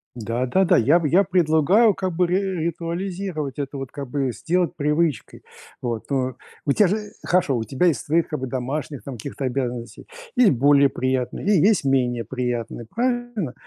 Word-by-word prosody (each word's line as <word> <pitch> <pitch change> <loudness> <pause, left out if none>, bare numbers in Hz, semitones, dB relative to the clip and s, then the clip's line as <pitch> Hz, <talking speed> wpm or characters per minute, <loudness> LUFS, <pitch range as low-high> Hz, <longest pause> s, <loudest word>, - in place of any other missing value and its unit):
Да, 115 +2 -2
да, 190 +10 +2
да. 180 -1 +4
Я 150 +9 +4
б 155 - -1
я 190 +6 +5
предлагаю, 180 +4 +3
как 185 -2 -2
бы, 180 +1 +2
ри 180 +3 +2 0.3
ритуализировать 170 -3 -4
это, 140 -1 -4
вот, 135 -2 -6
как 140 -2 -6
бы, 135 -2 -1
сделать 175 +7 -1
привычкой. 150 -3 -1 0.4
Вот. 115 -3 -3
Ну, 130 -2 0 0.3
у 140 - +2
тя 205 +7 +4
же 205 +5 +1 0.3
хорошо, 170 -8 +2
у 115 - -2
тебя 140 +9 +1
есть 165 - +1
свои, 165 +3 +3
как 155 -2 -5
бы, 130 - -3
домашних, 135 +3 -4
там, 135 - -7
каких-то 135 +4 -5
обязанностей. 125 -3 -4 0.3
Есть 245 -5 +5
более 140 +1 +4
приятные 130 +4 -2
и 205 -5 +4
есть 210 -2 +4
менее 125 -3 +1
приятные. 120 -2 -3
Правильно? 240 - -1
145 Hz, 180 wpm, -23 LUFS, 130-180 Hz, 0.4 s, я